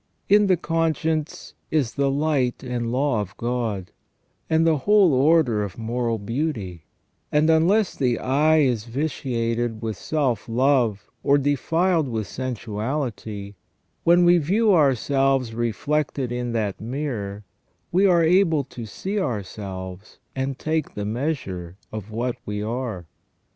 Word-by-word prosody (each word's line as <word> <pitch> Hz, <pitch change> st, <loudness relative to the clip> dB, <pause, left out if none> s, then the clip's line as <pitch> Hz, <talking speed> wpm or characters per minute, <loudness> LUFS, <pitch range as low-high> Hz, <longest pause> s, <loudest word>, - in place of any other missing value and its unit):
* -, -, -44 dB
In 210 Hz, -1 st, +4 dB
the 185 Hz, -2 st, +4 dB
conscience 160 Hz, -1 st, -1 dB, 0.2 s
is 145 Hz, -7 st, 0 dB
the 140 Hz, -1 st, +1 dB
light 140 Hz, -3 st, 0 dB
and 120 Hz, -2 st, -2 dB
law 130 Hz, -3 st, +1 dB
of 100 Hz, 0 st, -8 dB
God, 115 Hz, -6 st, -2 dB, 0.6 s
and 160 Hz, 0 st, +3 dB
the 160 Hz, -3 st, +3 dB
whole 200 Hz, +1 st, +4 dB
order 135 Hz, -5 st, +3 dB
of 100 Hz, -3 st, -6 dB
moral 115 Hz, 0 st, -1 dB
beauty; 105 Hz, -, -3 dB, 0.5 s
and, 150 Hz, +1 st, +3 dB
unless 180 Hz, +6 st, +3 dB
the 125 Hz, -3 st, +1 dB
eye 155 Hz, +4 st, +3 dB
is 120 Hz, -6 st, +1 dB
vitiated 120 Hz, -4 st, -2 dB
with 110 Hz, -2 st, -2 dB
self 125 Hz, -4 st, -1 dB
love 120 Hz, -4 st, +2 dB
or 140 Hz, +3 st, +4 dB
defiled 160 Hz, +4 st, +1 dB
with 110 Hz, -3 st, -2 dB
sensuality, 110 Hz, -, -4 dB, 0.5 s
when 175 Hz, +1 st, +5 dB
we 175 Hz, 0 st, +6 dB
view 200 Hz, +7 st, +3 dB
ourselves 135 Hz, -4 st, +2 dB
reflected 125 Hz, +3 st, -1 dB
in 120 Hz, 0 st, -2 dB
that 105 Hz, -4 st, -2 dB
mirror 110 Hz, -5 st, -4 dB, 0.5 s
we 190 Hz, +3 st, +4 dB
are 170 Hz, -3 st, +4 dB
able 165 Hz, -3 st, +3 dB
to 120 Hz, -3 st, -9 dB
see 195 Hz, -, -3 dB
ourselves 95 Hz, -, -5 dB, 0.2 s
and 135 Hz, 0 st, -2 dB
take 155 Hz, +1 st, -2 dB
the 105 Hz, -, -3 dB
measure 105 Hz, -, -3 dB
of 110 Hz, -1 st, -6 dB
what 120 Hz, +3 st, -2 dB
we 105 Hz, 0 st, -4 dB
are. 110 Hz, -5 st, -4 dB
130 Hz, 135 wpm, -23 LUFS, 110-155 Hz, 0.6 s, we